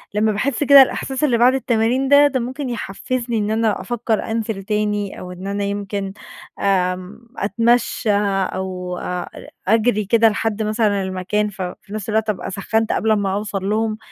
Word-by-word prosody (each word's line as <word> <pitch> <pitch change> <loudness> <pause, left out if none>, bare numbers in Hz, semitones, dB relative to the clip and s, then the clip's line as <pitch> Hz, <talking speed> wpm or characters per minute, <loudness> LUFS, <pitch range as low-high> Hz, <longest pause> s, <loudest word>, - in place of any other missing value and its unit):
لمّا 215 +1 +2
باحس 240 +6 -1
كده 280 -1 +9
الإحساس 265 +1 0
اللي 255 -6 +3
بعد 245 +2 +5
التمارين 250 +1 +1
ده، 285 +1 +7
ده 265 -2 -1
ممكن 255 +3 -4
يحفّزني 235 +2 -3
إن 210 0 -1
أنا 220 -3 +1
أفكّر 225 +1 -2
أنزِل 220 -3 -2
تاني 210 -1 -1
أو 180 - -8
إن 180 +2 -8
أنا 200 0 -2
يمكن 200 -1 -3 0.5
آمم، 185 +3 -1
أتمشّى 230 +1 +1 0.4
أو 180 -1 -4
أ 180 -1 -4 0.4
أجري 215 0 +2
كده 225 +2 +4
لحد 220 0 -2
مثلًا 215 -2 +1
المكان 190 +3 -1
ف 195 -1 -9
في 185 +2 -7
نفس 215 0 -5
الوقت 220 0 0
أبقى 200 -2 -3
سخّنت 220 +3 -1
قبل 220 0 +2
ما 200 -2 0
أوصل 200 -1 -3
لهم، 215 0 0
215 Hz, 165 wpm, -20 LUFS, 195-235 Hz, 0.5 s, كده